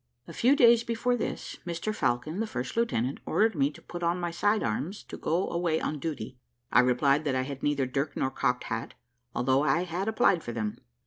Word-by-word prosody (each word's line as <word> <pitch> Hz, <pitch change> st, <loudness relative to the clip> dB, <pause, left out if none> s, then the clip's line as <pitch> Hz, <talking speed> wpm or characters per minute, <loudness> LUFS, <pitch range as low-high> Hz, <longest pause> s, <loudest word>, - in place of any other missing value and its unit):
A -, -, -9 dB
few 255 Hz, +4 st, +4 dB
days 235 Hz, -3 st, +6 dB
before 235 Hz, +2 st, 0 dB
this, 235 Hz, -, -4 dB
Mr 175 Hz, +5 st, -3 dB
Falcon, 155 Hz, -, -1 dB
the 225 Hz, -, -1 dB
first 125 Hz, -, -4 dB
lieutenant, 140 Hz, -, 0 dB
ordered 220 Hz, +1 st, +3 dB
me 140 Hz, -4 st, +2 dB
to 145 Hz, -, -14 dB
put 175 Hz, -, -7 dB
on 170 Hz, +1 st, +1 dB
my 175 Hz, -1 st, -2 dB
side 205 Hz, +5 st, +1 dB
arms 145 Hz, -, -3 dB
to -, -, -9 dB
go 170 Hz, +4 st, 0 dB
away 170 Hz, -2 st, +1 dB
on 150 Hz, -, -3 dB
duty. 135 Hz, -6 st, -5 dB, 0.3 s
I -, -, +6 dB
replied 135 Hz, +4 st, +3 dB
that 135 Hz, -3 st, +1 dB
I 130 Hz, -, +1 dB
had 135 Hz, 0 st, -6 dB
neither 145 Hz, -2 st, +1 dB
dirk 140 Hz, +3 st, -2 dB
nor 130 Hz, -, 0 dB
cocked 125 Hz, -2 st, 0 dB
hat, 115 Hz, 0 st, -4 dB, 0.4 s
although 130 Hz, +2 st, +2 dB
I 170 Hz, +3 st, +2 dB
had 180 Hz, +3 st, -3 dB
applied 220 Hz, -6 st, +3 dB
for 120 Hz, -, -6 dB
them. 110 Hz, -2 st, -3 dB
155 Hz, 210 wpm, -28 LUFS, 130-195 Hz, 0.4 s, days